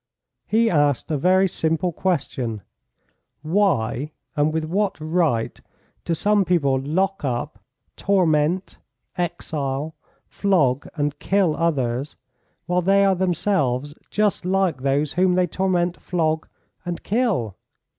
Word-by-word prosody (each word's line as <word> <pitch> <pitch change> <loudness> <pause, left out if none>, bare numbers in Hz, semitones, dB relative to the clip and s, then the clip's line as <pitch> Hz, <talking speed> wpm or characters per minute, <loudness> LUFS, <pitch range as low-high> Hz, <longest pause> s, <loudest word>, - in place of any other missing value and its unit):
He 230 +2 +3
asked 145 - +1
a - - +1
very 185 +4 +4
simple 165 +1 -1
question: 130 - -2 0.8
"Why, 155 - 0 0.2
and 150 0 +2
with 160 0 -1
what 195 +4 -1
right, 155 -7 0 0.4
do 170 - 0
some 205 +4 +2
people 145 -8 +2
lock 190 +8 -1
up, 130 +2 -3 0.4
torment, 180 -2 +1 0.4
exile, 155 -4 -3 0.3
flog, 145 -10 +1
and 145 -2 -2
kill 195 -6 +2
others, 140 -4 -1 0.5
while 180 0 +1
they 195 +2 +4
are 195 - +4
themselves 165 -7 0 0.2
just 210 -3 +1
like 185 -6 +1
those 140 +2 0
whom 180 +1 +3
they 180 0 +3
torment, 180 0 -1
flog, 160 -3 -1 0.4
and 175 -1 -5
kill?" 200 - 0
165 Hz, 115 wpm, -22 LUFS, 145-190 Hz, 0.8 s, very